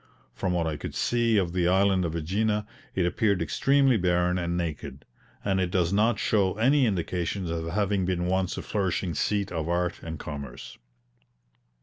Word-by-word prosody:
From 95 - -2
what 85 -2 0
I 80 -2 -2
could - - -7
see 120 -2 +2
of 90 -4 0
the 90 -1 +1
island 95 0 +3
of 80 - -3
AEgina, 105 +6 0 0.3
it 90 - +2
appeared 100 +1 +1
extremely 135 0 +3
barren 90 -1 +1
and 85 0 -2
naked, 75 -5 -5 0.4
and 95 -1 +1
it 90 - 0
does 90 0 +1
not 110 +2 +3
show 100 -3 +1
any 130 +4 +3
indications 90 -1 -2
of 85 0 -3
having 100 +2 0
been 90 -1 -1
once 95 0 0
a - - -4
flourishing 95 -3 -1
seat 100 +5 -1
of 80 -1 -3
art 90 0 -1
and 80 -1 -6
commerce. 70 -4 -8
90 Hz, 170 wpm, -27 LUFS, 85-100 Hz, 0.4 s, island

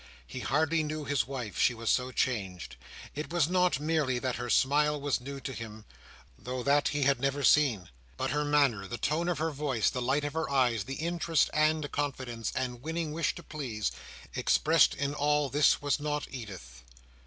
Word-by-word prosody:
He 130 - -7
hardly 160 +5 +1
knew 155 0 -4
his 140 -6 0
wife. 125 -9 -5
She 125 - +3
was 115 0 0
so 130 0 0
changed. 95 - -2 0.4
It 150 +2 -5
was 170 -4 +2
not 180 -4 +2
merely 150 -4 0
that 125 0 -2
her 120 0 -4
smile 150 +4 +3
was 140 -3 -1
new 140 +2 -7
to 135 - -5
him—though 105 - -9
that 145 +2 +3
he 145 -1 0
had 135 -1 +3
never 140 +2 -1
seen; 130 - +4 0.3
but 130 - -1
her 150 +1 0
manner, 140 -9 +2
the 120 - -5
tone 160 +7 0
of 175 - 0
her 160 +1 -1
voice, 135 -6 0
the 125 - -3
light 135 +4 +1
of 145 - -3
her 160 0 -2
eyes, 120 -7 +2
the 135 - -5
interest, 165 -1 0
and 155 -1 +1
confidence, 130 -5 -3
and 125 -2 -3
winning 160 +1 -3
wish 160 +1 -1
to - - -9
please, 125 -9 -3 0.4
expressed 160 0 +3
in 140 0 -2
all 150 -1 +1
this 145 0 +3
was 145 -1 +1
not 150 0 -2
Edith. 95 - -9
140 Hz, 190 wpm, -30 LUFS, 120-150 Hz, 0.4 s, seen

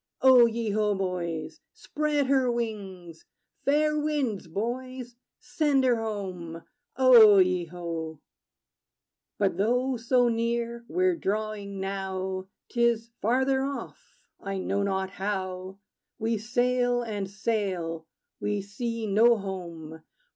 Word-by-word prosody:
O 255 -3 +8
ye 230 -1 -2
ho, 210 0 +1
boys! 170 -4 -3
Spread 295 -1 -1
her 260 -2 +2
wings! 195 -8 -5 0.4
Fair 300 +2 +2
winds, 280 - -1
boys: 245 +6 -4 0.2
send 290 -4 +1
her 250 -2 +3
home. 185 -7 -5 0.3
O 235 -6 +8
ye 185 -2 +3
ho! 165 -2 -6 1.2
But - - +1
though 250 +5 +1
so 245 +1 +2
near 235 0 -1
we're 370 +3 +2
drawing, 210 -5 -3
now, 190 -1 -3 0.2
'T 235 -1 0
is 230 -1 +1
farther 265 +4 +2
off 280 - -7 0.2
I 195 -1 -4
know 195 +1 -1
not 190 -1 -1
how. 190 -1 -4 0.4
We 225 0 -1
sail 245 +2 +1
and 205 -4 -4
sail: 185 -6 -2 0.3
we 205 -1 -1
see 230 +3 -4
no 225 +3 +5
home. 170 -5 -7
215 Hz, 115 wpm, -27 LUFS, 190-245 Hz, 1.2 s, O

